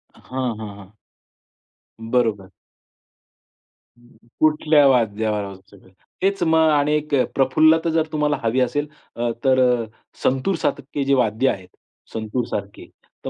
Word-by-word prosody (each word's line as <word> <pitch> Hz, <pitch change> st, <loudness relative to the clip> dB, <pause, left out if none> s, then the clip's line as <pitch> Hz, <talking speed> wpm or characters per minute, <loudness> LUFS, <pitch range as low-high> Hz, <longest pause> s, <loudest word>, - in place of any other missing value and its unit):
हां, 130 Hz, -3 st, -4 dB
हां, 105 Hz, -2 st, -8 dB
हां. 100 Hz, 0 st, -14 dB, 1.1 s
बरोबर. 115 Hz, -4 st, -1 dB, 1.9 s
कुठल्या 150 Hz, -1 st, +4 dB
वाद्यावर 110 Hz, -4 st, +1 dB
वाजवायचं. 95 Hz, 0 st, -13 dB, 0.3 s
तेच 195 Hz, 0 st, 0 dB
मग 160 Hz, -1 st, +4 dB
आणि 150 Hz, 0 st, +2 dB
एक 150 Hz, -1 st, -2 dB
अ, 130 Hz, -, +3 dB
प्रफुल्लता 155 Hz, +5 st, +3 dB
जर 160 Hz, -1 st, +1 dB
तुम्हाला 150 Hz, -1 st, 0 dB
हवी 115 Hz, +3 st, +1 dB
असेल 145 Hz, +4 st, 0 dB, 0.3 s
अ, 120 Hz, 0 st, -1 dB
तर 125 Hz, -3 st, +3 dB, 0.4 s
संतूरसारखे 140 Hz, -1 st, -1 dB
जे 140 Hz, 0 st, +1 dB
वाद्य 125 Hz, 0 st, +2 dB
आहेत 95 Hz, -2 st, -4 dB, 0.5 s
संतूरसारखे. 110 Hz, -2 st, -4 dB, 0.4 s
तर -, -, -2 dB
130 Hz, 115 wpm, -21 LUFS, 110-150 Hz, 1.9 s, कुठल्या